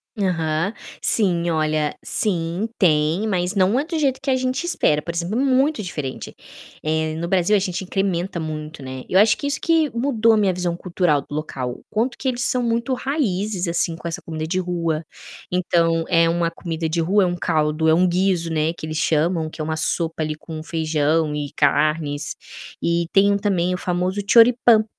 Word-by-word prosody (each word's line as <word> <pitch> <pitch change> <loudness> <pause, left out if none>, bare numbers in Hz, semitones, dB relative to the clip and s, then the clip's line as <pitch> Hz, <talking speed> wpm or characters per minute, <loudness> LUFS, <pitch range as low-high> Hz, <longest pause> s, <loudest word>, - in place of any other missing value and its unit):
Aham. 170 -1 -1 0.3
Sim, 175 -6 +3
olha, 155 -1 0
sim, 175 +1 0
tem, 160 +3 +2
mas 180 -1 0
não 200 +6 +2
é 290 - -2
do 330 -1 -3
jeito 270 -3 +1
que 275 0 -1
a - - +3
gente 255 +3 -1
espera, 245 - +1
por 170 +3 -6
exemplo, 175 +8 -2
é - - +2
muito 270 -2 +2
diferente. 150 -7 -5 0.5
Eh, 155 0 0
no 170 +1 -3
Brasil 185 +3 +2
a 205 - +4
gente 185 -1 -3
incrementa 190 -2 -2
muito, 155 -1 -6
né. 130 -1 -7
Eu 185 - +3
acho 210 +1 +5
que - - -6
isso 285 0 -1
que 325 -3 +2
mudou 235 -3 +2
a 220 - +3
minha 200 -3 +3
visão 175 -1 -2
cultural 175 -4 0
do 145 - -9
local, 135 -5 -4
o - - -14
quanto 235 +3 -1
que 265 - -4
eles 250 -1 -1
são 250 0 +1
muito 235 +2 0
raízes, 215 - -1
assim, 170 -1 0
com 170 - -7
essa 165 - -4
comida 160 -1 -5
de 185 +3 -1
rua. 170 -3 -2 0.5
Então, 170 -2 +1
eh, 165 -2 +4
uma 170 0 +1
comida 165 -1 -4
de 165 +2 -1
rua 190 +5 +3
é - - +3
uma 175 0 -2
caldo, 155 -1 0
é 160 - +5
um 180 +3 +4
guizo, 180 -2 +1
né, 160 +1 0
que 155 - -8
eles 155 - -4
chamam, 160 +1 +1
que - - -7
é - - -1
uma 160 +1 -2
sopa 160 0 -1
ali 155 - -2
com 155 0 -8
feijão 155 -1 0
e 145 -1 -4
carnes. 150 0 +1 0.5
E 170 0 +1
tem 200 +1 +4
também 185 -3 0
o - - -4
famoso 180 +2 -1
Choripan 230 0 +6
175 Hz, 200 wpm, -21 LUFS, 160-205 Hz, 0.5 s, Choripan